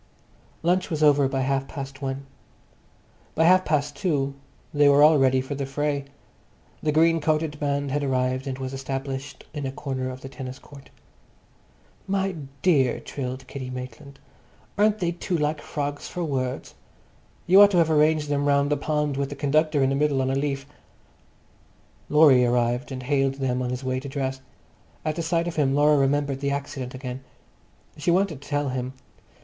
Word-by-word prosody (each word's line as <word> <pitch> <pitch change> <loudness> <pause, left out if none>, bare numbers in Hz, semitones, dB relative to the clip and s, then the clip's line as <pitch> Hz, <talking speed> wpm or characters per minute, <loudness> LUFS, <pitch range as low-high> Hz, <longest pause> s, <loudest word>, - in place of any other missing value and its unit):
Lunch 180 +2 +1
was 155 -3 -1
over 145 -2 +5
by 135 0 -1
half 135 0 0
past 135 -1 -7
one. 135 0 -4 1.1
By 160 - +3
half 185 +2 +6
past 145 -2 0
two 145 -8 0 0.4
they 145 -1 +5
were 140 +1 +6
all 155 -1 +6
ready 130 -1 +3
for 130 +2 -5
the 140 -1 -3
fray. 145 0 -1 0.8
The 150 - +1
green 165 +1 +3
coated 155 -1 0
band 140 -1 -1
had 145 +1 0
arrived 130 0 0
and 130 -1 -3
was 130 0 -5
established 135 0 -5
in 145 -3 -3
a - - -3
corner 130 -2 -4
of 130 0 -8
the 135 - -7
tennis 130 -1 -7
court. 140 -1 -15 1.2
"My 195 0 0 0.3
dear!" 140 -9 +3
trilled 130 -1 -6
Kitty 130 -2 -7
Maitland, 130 +2 -8 0.6
"aren't 210 +1 +3
they 175 -4 -1
too 175 +1 -2
like 150 0 -1
frogs 145 -1 -4
for 175 - -4
words? 130 -5 -3 0.7
You 190 +3 +7
ought 205 - +9
to 190 - +1
have 165 -2 +3
arranged 155 0 +3
them 145 0 0
round 140 0 +2
the 145 - +2
pond 150 -1 -1
with 140 -1 -1
the 145 - -6
conductor 150 +1 +2
in 135 - +3
the - - +1
middle 145 -1 +1
on 130 - 0
a - - 0
leaf." 135 -1 -2 1.4
Laurie 150 -4 +6
arrived 120 +2 +1
and 130 -1 -5
hailed 135 0 +1
them 130 -2 -1
on 125 - -2
his 125 +1 -4
way 130 0 -1
to 140 +1 -8
dress. 135 -1 -3 0.6
At 155 -1 -1
the 170 - -2
sight 165 +1 0
of 170 - -5
him 140 -2 +2
Laura 150 +1 +5
remembered 140 0 +1
the 140 0 -1
accident 140 -2 -4
again. 130 0 -6 0.7
She 150 +3 -1
wanted 175 -5 +1
to 145 - -13
tell 145 -1 0
him. 130 0 -3
140 Hz, 180 wpm, -25 LUFS, 135-150 Hz, 1.4 s, ought